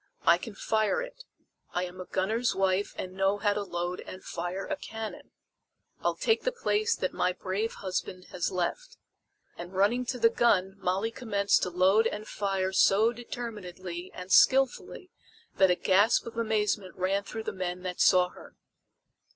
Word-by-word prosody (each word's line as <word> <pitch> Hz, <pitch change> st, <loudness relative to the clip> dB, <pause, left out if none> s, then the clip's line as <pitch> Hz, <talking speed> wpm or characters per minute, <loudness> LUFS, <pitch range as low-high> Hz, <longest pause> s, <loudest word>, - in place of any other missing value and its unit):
I 170 Hz, +1 st, +5 dB
can 210 Hz, +2 st, -8 dB
fire 220 Hz, -, 0 dB
it. -, -, -11 dB, 0.5 s
I 180 Hz, +1 st, 0 dB
am 180 Hz, +1 st, -9 dB
a -, -, -7 dB
gunner's 220 Hz, +7 st, 0 dB
wife 190 Hz, +1 st, 0 dB
and 185 Hz, 0 st, -5 dB
know 195 Hz, +1 st, +1 dB
how 205 Hz, 0 st, +1 dB
to 205 Hz, -, -2 dB
load 175 Hz, -2 st, -3 dB
and 185 Hz, -, -10 dB
fire 175 Hz, +3 st, -4 dB
a 300 Hz, -, -2 dB
cannon. 220 Hz, -5 st, -7 dB, 0.7 s
I'll -, -, 0 dB
take 450 Hz, -, +1 dB
the -, -, 0 dB
place 460 Hz, -2 st, 0 dB
that -, -, -2 dB
my 180 Hz, 0 st, +1 dB
brave 195 Hz, +5 st, -3 dB
husband 185 Hz, -1 st, -4 dB
has 180 Hz, -, -1 dB
left!" 475 Hz, -, -3 dB, 0.6 s
And 175 Hz, +2 st, -8 dB
running 235 Hz, +6 st, +2 dB
to 255 Hz, -, -2 dB
the 230 Hz, -1 st, +4 dB
gun 195 Hz, -6 st, +2 dB
Molly 195 Hz, +5 st, 0 dB
commenced 205 Hz, -5 st, +1 dB
to -, -, 0 dB
load 190 Hz, +5 st, +4 dB
and 215 Hz, +1 st, -5 dB
fire 195 Hz, -2 st, -1 dB
so 215 Hz, +5 st, +4 dB
determinedly 190 Hz, -7 st, -7 dB
and 180 Hz, +1 st, -8 dB
skilfully 270 Hz, +7 st, +3 dB, 0.5 s
that 190 Hz, -1 st, +5 dB
a 180 Hz, -, +4 dB
gasp 200 Hz, +5 st, +3 dB
of 230 Hz, 0 st, -8 dB
amazement 210 Hz, -4 st, -1 dB
ran 195 Hz, +2 st, 0 dB
through 220 Hz, +2 st, -6 dB
the -, -, -3 dB
men 180 Hz, -1 st, -4 dB
that 180 Hz, -1 st, -3 dB
saw 180 Hz, -1 st, +5 dB
her. -, -, -15 dB
195 Hz, 170 wpm, -29 LUFS, 185-225 Hz, 0.7 s, I